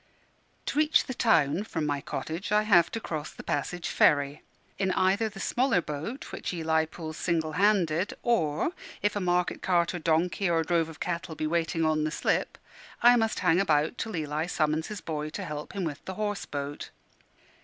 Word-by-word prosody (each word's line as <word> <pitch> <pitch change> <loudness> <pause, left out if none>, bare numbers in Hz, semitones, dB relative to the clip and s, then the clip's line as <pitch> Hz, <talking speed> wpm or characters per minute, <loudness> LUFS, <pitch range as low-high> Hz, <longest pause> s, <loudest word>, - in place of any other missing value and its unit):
To 290 - -1
reach 310 +1 +4
the 260 - -4
town 190 - +3
from 165 -8 -3
my 145 -1 -1
cottage 165 +5 -5
I 210 0 +4
have 175 -6 +5
to 225 - -1
cross 155 -7 -4
the - - -11
Passage 170 +5 -2
Ferry, 145 0 +3 0.4
either 190 +2 +2
in 220 - -3
the 195 - -10
smaller 240 0 +2
boat 160 - -5
which - - -4
Eli 160 -1 +1
pulls 160 0 -8
single 160 -3 0
handed, 185 -2 +2
or 165 - +1 0.3
(if 205 0 +1
a - - 0
market 180 -1 0
cart 175 -2 +2
or 175 - -3
donkey, 170 +4 +1
or 165 -1 +2
drove 165 -1 +1
of 160 - -11
cattle 170 -2 -3
be 155 - -2
waiting 165 0 0
on 155 -1 +2
the 155 - 0
slip) - - -1 0.5
I 240 +1 +8
must 225 -2 0
hang 180 -2 +4
about 160 +1 +1
till 220 -3 -3
Eli 155 0 -2
summons 155 -2 0
his 210 -4 -6
boy 155 -2 -3
to 190 +5 -5
help 150 -2 -6
him 195 - -3
with 155 -3 -4
the 190 - -5
horse 205 0 -2
boat. 145 0 -5
170 Hz, 190 wpm, -28 LUFS, 155-200 Hz, 0.5 s, I